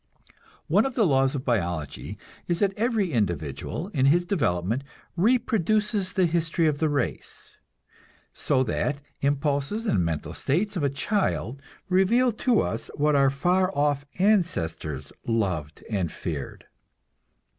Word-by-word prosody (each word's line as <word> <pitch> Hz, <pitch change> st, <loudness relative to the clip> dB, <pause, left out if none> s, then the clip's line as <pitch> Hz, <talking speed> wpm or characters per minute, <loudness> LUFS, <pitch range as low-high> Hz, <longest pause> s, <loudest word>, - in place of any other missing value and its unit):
One 200 Hz, -, +3 dB
of 265 Hz, -, -7 dB
the 225 Hz, -, +3 dB
laws 135 Hz, -3 st, +2 dB
of 135 Hz, -, -4 dB
biology 85 Hz, -, -2 dB, 0.3 s
is 175 Hz, -, 0 dB
that 195 Hz, +1 st, +1 dB
every 220 Hz, -5 st, 0 dB
individual, 90 Hz, -, -2 dB
in 135 Hz, -8 st, +2 dB
his 175 Hz, +5 st, +4 dB
development, 115 Hz, -, 0 dB, 0.3 s
reproduces 215 Hz, -1 st, +1 dB
the 190 Hz, -2 st, +3 dB
history 165 Hz, 0 st, +1 dB
of 150 Hz, -2 st, +1 dB
the 160 Hz, -, +2 dB
race; 145 Hz, -1 st, -4 dB, 0.8 s
so 130 Hz, -2 st, +1 dB
that 140 Hz, +4 st, -1 dB, 0.2 s
impulses 145 Hz, -, 0 dB
and 100 Hz, -, +2 dB
mental 80 Hz, -3 st, -3 dB
states 200 Hz, +9 st, -1 dB
of 175 Hz, -, -1 dB
a 140 Hz, -, +2 dB
child 140 Hz, -, -1 dB, 0.3 s
reveal 210 Hz, +7 st, +3 dB
to 230 Hz, +1 st, +2 dB
us -, -, -3 dB
what 150 Hz, 0 st, +2 dB
our 140 Hz, -1 st, +5 dB
far 180 Hz, +7 st, +1 dB
off 145 Hz, -1 st, +1 dB
ancestors 85 Hz, -, 0 dB
loved 90 Hz, -10 st, -1 dB
and 95 Hz, -7 st, -1 dB
feared. 75 Hz, -6 st, -6 dB
145 Hz, 135 wpm, -26 LUFS, 115-190 Hz, 0.8 s, our